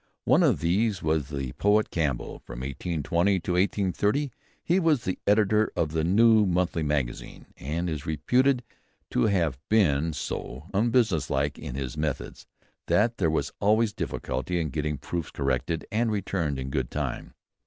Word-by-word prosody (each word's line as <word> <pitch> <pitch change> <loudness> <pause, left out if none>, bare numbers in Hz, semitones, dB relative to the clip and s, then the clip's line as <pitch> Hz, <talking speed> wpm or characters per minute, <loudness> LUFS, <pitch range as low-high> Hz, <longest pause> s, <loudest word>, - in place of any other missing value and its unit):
One 130 +8 +5
of 130 - +3
these 95 +4 +1
was 80 -3 0
the 70 -4 -4
poet 105 +1 +3
Campbell. 70 -8 -2
From - - -9
1820 85 +7 0
to 90 - -3
1830 100 - +1 0.3
he 175 +3 +2
was 155 - +2 0.2
editor 105 +1 +3
of 75 - 0
the 80 0 0
New 110 +4 +5
Monthly 90 -2 0
Magazine, 75 -5 -3
and 80 +6 -3
is 80 -2 -4
reputed 125 - +2 0.5
to 60 - +2
have 85 -10 +1
been 80 -8 +3
so 70 -1 -5
very 100 +4 +2
unbusinesslike 80 - +1
in - - -6
his 65 0 -4
methods 75 -3 -4 0.4
that 115 +3 +2
there 85 -4 +2
was 80 - -1
always 110 +1 +3
difficulty 90 -1 -3
in 80 -2 -1
getting 75 +1 -2
proofs 85 +1 -4
corrected 70 +4 -1
and 115 +1 +1
returned 90 -8 -1
in 65 0 -5
good 65 -4 -1
time. - - -4
85 Hz, 155 wpm, -27 LUFS, 75-105 Hz, 0.5 s, One